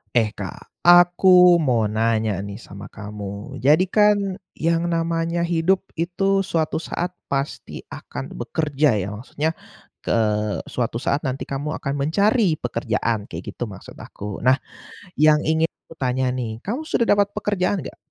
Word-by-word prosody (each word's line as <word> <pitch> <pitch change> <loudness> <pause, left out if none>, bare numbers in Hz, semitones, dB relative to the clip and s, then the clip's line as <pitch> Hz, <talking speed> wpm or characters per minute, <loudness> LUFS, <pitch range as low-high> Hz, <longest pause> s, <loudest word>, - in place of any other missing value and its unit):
Eh 110 -3 +3
Kak, - - -7 0.2
aku 175 +1 +6 0.4
mau 120 -3 +3
nanya 110 -1 +1 0.2
nih 100 - -7
sama 100 +1 -9
kamu. 105 -1 -7 0.4
Jadi 155 +6 +6
kan 210 -1 +6 0.5
yang 165 0 +3
namanya 165 0 0
hidup 175 +3 +3 0.2
itu 175 +3 -2 0.3
suatu 160 -2 0
saat 180 +1 -2 0.2
pasti 140 +1 -3 0.2
akan - - -7 0.2
bekerja 150 -2 0
ya, - - -3
maksudnya 145 +7 -2 0.5
k - - -31
eee, 105 -2 0
suatu 120 -2 -1
saat 140 - +2
nanti 130 +1 -3
kamu 140 +2 -4
akan 140 - -3
mencari 200 - +2
pekerjaan. 115 -2 -1
Kayak 85 +1 -7
gitu - - -5
maksud 95 -3 -11
aku. 105 0 -7
Nah, 130 +2 +4 0.6
yang 155 0 +5
ingin 160 +1 +1 0.2
aku 165 - -12
tanya 130 -1 0
nih 120 -3 -4
kamu 240 +10 -3
sudah 235 - +1
dapat 205 -1 +4
pekerjaan 200 -3 0
gak? - - -9
150 Hz, 150 wpm, -22 LUFS, 115-170 Hz, 0.6 s, aku